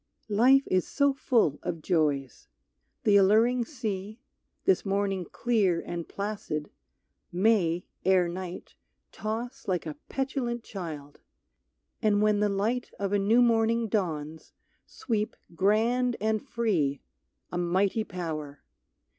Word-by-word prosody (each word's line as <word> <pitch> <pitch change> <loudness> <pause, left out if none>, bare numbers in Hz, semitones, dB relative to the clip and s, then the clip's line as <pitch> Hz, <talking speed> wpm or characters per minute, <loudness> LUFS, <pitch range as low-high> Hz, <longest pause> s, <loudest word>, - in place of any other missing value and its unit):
Life 255 +6 +5
is 185 -1 +1
so 280 -1 +2
full 230 - +1
of 165 -2 -4
joys. 145 -7 0 0.6
The 205 -1 +5
alluring 225 +5 +4
sea, 215 -5 -5 0.5
This 385 - +3
morning 195 -2 -1
clear 205 -5 +1
and 170 -1 -6
placid, 200 -7 -4 0.6
may, 180 -3 +2 0.2
ere 185 -1 +4
night, 180 +1 -7 0.4
Toss 235 +5 -5
like 180 -3 -1
a 155 - -4 0.2
petulant 260 -3 -2
child, 155 -9 -7 0.8
and 210 -3 +3
when 210 -1 +3
the 210 0 +2
light 215 +5 -1
Of 200 0 -1
a 205 - +3
new 225 +5 +4
morning 230 0 +2
dawns 160 -6 -3 0.3
sweep 215 -3 -2 0.2
grand 230 +7 +2
and 215 0 0
free 195 - -1 0.5
A 175 - -2
mighty 190 +5 +1
power. 155 -7 -6
205 Hz, 120 wpm, -28 LUFS, 175-230 Hz, 0.8 s, Life